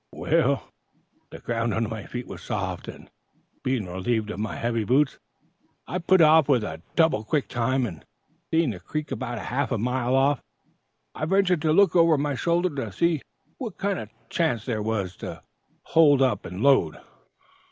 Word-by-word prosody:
"Well, - - +1 0.6
the - - -9
ground 115 -2 -2
under 115 0 0
my 110 -1 -6
feet 125 0 -5
was - - -9
soft, - - -4
and, - - -11 0.5
being 130 -5 -1
relieved 105 +5 -2
of 100 - -6
my 105 0 -3
heavy 115 -1 -1
boots, 135 +6 +2 0.7
I 180 - -3
put 185 +1 +4
off 155 -1 +6
with 125 -6 +3 0.3
double 160 -10 +3
quick 145 +5 -1
time, 125 +2 0
and, 85 - -7 0.5
seeing 160 -5 +2
the 95 - -7
creek 155 - -5
about - - -4
half - - -2
a - - +1
mile 125 +2 0
off, 135 0 +3 0.7
I 155 - -3
ventured 185 -2 +2
to 160 -1 +2
look 195 +3 +4
over 165 -2 +5
my 145 0 -1
shoulder 170 +5 0
to 135 - -3
see 170 -4 +1 0.4
what 230 -8 -6
kind 200 -1 -1
of - - -7 0.2
chance 155 - 0
there 115 -4 -2
was 105 -4 -2
to - - -8 0.4
hold 145 -4 +5
up 120 -7 0
and 90 +4 -5
load. 135 - +4
135 Hz, 175 wpm, -25 LUFS, 115-160 Hz, 0.7 s, off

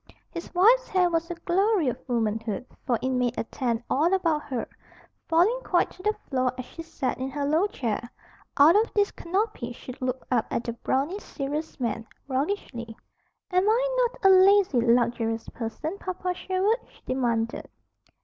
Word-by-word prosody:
His 340 - -7
wife's 470 +8 +5
hair 365 -2 +2
was 330 +1 0
"a 345 - -3
glory 375 +1 +1
of 250 +1 -2
womanhood," 225 -2 -1 0.2
for 240 -3 +2
it 260 - +1
made 250 -1 0
a - - 0
tent 235 0 -2
all 315 +6 +2
about 330 -5 +1
her, 255 -5 -3 0.6
falling 360 +9 +3
quite 350 - +1
to 365 - -14
the 425 +2 +1
floor 255 -2 +1
as 255 - -5
she 330 - -9
sat 325 -7 -3
in 260 +1 -2
her 285 +1 -2
low 315 +7 +2
chair. 235 - -3 0.5
Out 300 +5 +7
of 435 +2 +3
this 410 -1 +3
canopy 360 - -2
she 255 - -9
looked 255 0 -2
up 240 -3 +2
at 230 - -1
the 235 - -3
brawny, 275 - -1
serious 300 -2 -5
man, 230 -2 -2 0.2
roguishly. 260 - -3 0.5
"Am 365 +3 +3
I - - +2
not 440 - -11
a 385 - +9
lazy, 375 -8 +5
luxurious 230 -1 +1
person, 300 - -5
Papa 365 0 -3
Sherwood?" 380 +5 0
she - - -23
demanded. 235 -3 -1
295 Hz, 170 wpm, -26 LUFS, 245-370 Hz, 0.6 s, a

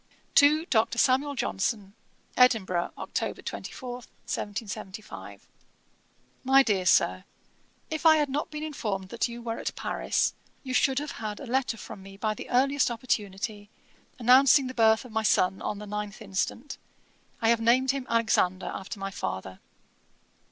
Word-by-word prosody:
'To 300 +3 +5
DR. 225 -9 +3
SAMUEL 270 +4 +2
JOHNSON. 195 - -2 0.4
'Edinburgh, 210 -9 +3
Oct. - - -4
24, 255 -4 -6
1775. 210 -3 -7 1.0
'MY 270 +1 +6
DEAR 195 -6 0
SIR, - - +3 0.7
'If 315 - -3
I 320 -1 +7
had 300 -1 +2
not 280 +2 -2
been 300 0 -6
informed 210 -11 -4
that 235 - -1
you 235 0 -8
were 230 -1 -3
at - - -4
Paris, - - 0 0.3
you 260 -2 -5
should 265 +1 +3
have 295 +1 -2
had 215 -2 -5
a - - -7
letter 255 -1 0
from 200 - -9
me 195 0 -12
by 215 +1 -1
the - - -9
earliest 270 +2 +3
opportunity, 210 -3 -3 0.5
announcing 260 +3 +6
the 255 - -5
birth 220 0 +3
of 250 - -11
my 220 0 0
son, 190 -3 +2
on 210 - -3
the 210 - -8
9th 210 0 -5
instant; 225 +7 -3 0.6
I 225 - +2
have 230 -1 +3
named 250 +3 +4
him 270 -2 -5
Alexander, 220 -5 +1
after 195 +2 -7
my 195 0 -4
father. 95 - -5
230 Hz, 150 wpm, -27 LUFS, 205-265 Hz, 1.0 s, I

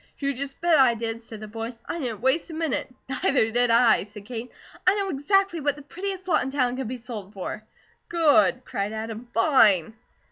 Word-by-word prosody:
"You 280 -1 -1
just 275 +1 -6
bet 335 -3 +4
I 250 -3 +5
did," 230 0 -4
said 220 -2 -10
the 215 - -7
boy. 225 +2 -6
"I 340 - -4
didn't 235 -7 -4
waste 265 +8 +1
a 320 - -7
minute." 320 -5 -1 0.2
"Neither 260 -3 +1
did 245 +1 +2
I," 230 0 +5
said 205 0 -10
Kate. 240 +1 -6 0.4
"I 375 - +6
know 400 -1 -1
exactly 375 +4 +1
what 290 -1 0
the 290 - -12
prettiest 375 +4 -5
lot 340 - +3
in - - -2
town 255 -3 0
can 260 -2 -4
be 255 +2 -4
sold 220 -5 -8
for." 200 +2 -6 0.5
"Good!" 315 -6 +3
cried 200 +2 -3
Adam. 225 +2 -6
"Fine!" 225 - +4
250 Hz, 205 wpm, -25 LUFS, 225-300 Hz, 0.5 s, I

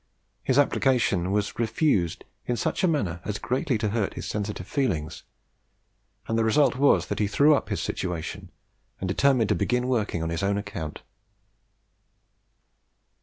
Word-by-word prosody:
His 130 - +1
application 120 -10 +2
was 105 +2 -1
refused 110 - +1 0.2
in 120 - 0
such - - -1
a - - +5
manner 95 - -1
as 105 0 -3
greatly 130 - -1
to 105 0 -1
hurt 105 -2 -1
his - - -6
sensitive 105 -3 -4
feelings; 95 - -1 1.1
and 115 0 0
the - - +3
result 125 +4 +3
was 140 +2 +4
that - - -4
he 105 - +2
threw 145 +9 +4
up 145 - 0
his - - -2
situation, 90 -3 -4 0.5
and 95 - -3
determined 120 +3 +2
to - - +4
begin 125 0 0
working 105 -9 0
on 80 - -2
his 85 - -2
own 100 +1 +1
account. 100 -7 -6
110 Hz, 155 wpm, -26 LUFS, 95-130 Hz, 1.1 s, a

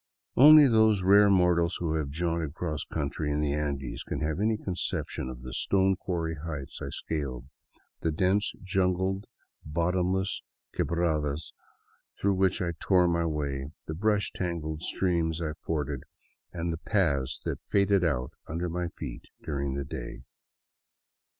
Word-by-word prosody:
Only 150 +2 +9
those 110 -4 +4
rare 100 +2 +7
mortals 90 -2 +3
who 80 -3 -1
have 80 -3 -1
jaunted 80 0 -2
cross 75 -6 -2
country 75 0 -3
in 75 - 0
the 75 -1 +1
Andes 70 -3 -3
can - - -4
have 75 +3 -1
any 110 +1 +2
conception 90 -8 -3
of 65 -1 -9
the 65 +1 -7
stone 95 +7 +2
quarry 85 -3 -2
heights 75 -5 -6
I - - -4
scaled, 65 -6 -4 0.5
the 80 - 0
dense 95 +6 +1
jungled, 95 +1 0 0.4
bottomless 90 +4 0 0.3
quebradas 80 -3 -1 0.7
through 100 0 +2
which 95 +1 +2
I 85 - -1
tore 90 -2 +4
my 85 -1 +1
way, 70 -3 -2 0.2
the 80 - -4
brush 105 +4 +1
tangled 80 -4 -3
streams 85 -3 0
I 80 -2 -2
forded, 75 -4 -2 0.5
and 85 -1 -2
the - - -4
paths 75 - 0
that - - -2
faded 100 -1 +3
out 65 -7 0 0.2
under 85 +3 -2
my 90 +1 -2
feet - - -6 0.2
during 70 -3 -2
that 70 0 -4
day. - - -6
85 Hz, 145 wpm, -28 LUFS, 75-95 Hz, 0.7 s, Only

